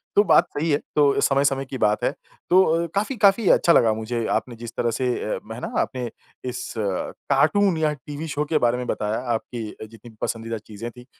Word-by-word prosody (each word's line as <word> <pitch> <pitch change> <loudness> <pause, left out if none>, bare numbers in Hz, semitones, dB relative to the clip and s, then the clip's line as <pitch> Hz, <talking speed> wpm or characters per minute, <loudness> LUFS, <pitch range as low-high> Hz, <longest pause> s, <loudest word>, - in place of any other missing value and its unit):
तो 205 - +6
बात - - +5
सही 160 +3 0
है। 145 - +4 0.2
तो 145 -2 +4
समय-समय 135 0 +2
की 130 0 -6
बात 105 -3 +1
है। - - +2 0.4
तो 185 +2 +6
अ, 165 -1 +1
काफ़ी 215 +7 0
काफ़ी 200 +1 +4
अच्छा 170 - +5
लगा 110 -2 +5
मुझे 110 +1 -3
आपने 120 - -1
जिस 115 0 -8
तरह 120 - +1
से 125 +3 -2 0.3
अ, - - -5
है - - -7
ना? - - -6
आपने 125 -2 -3 0.4
इस 125 - -6
कार्टून 160 - +1
या 155 -1 +1
टीवी 145 +3 -7
शो 150 0 -2
के 155 +1 +1
बारे 120 -3 +2
में 125 0 -4
बताया, 105 +1 -1 0.2
आपकी 110 -1 -5
जितनी 115 +1 -15
पसंदीदा 115 0 -3
चीज़ें 110 +2 -8
थी। 125 +1 -14
125 Hz, 205 wpm, -23 LUFS, 115-155 Hz, 0.4 s, तो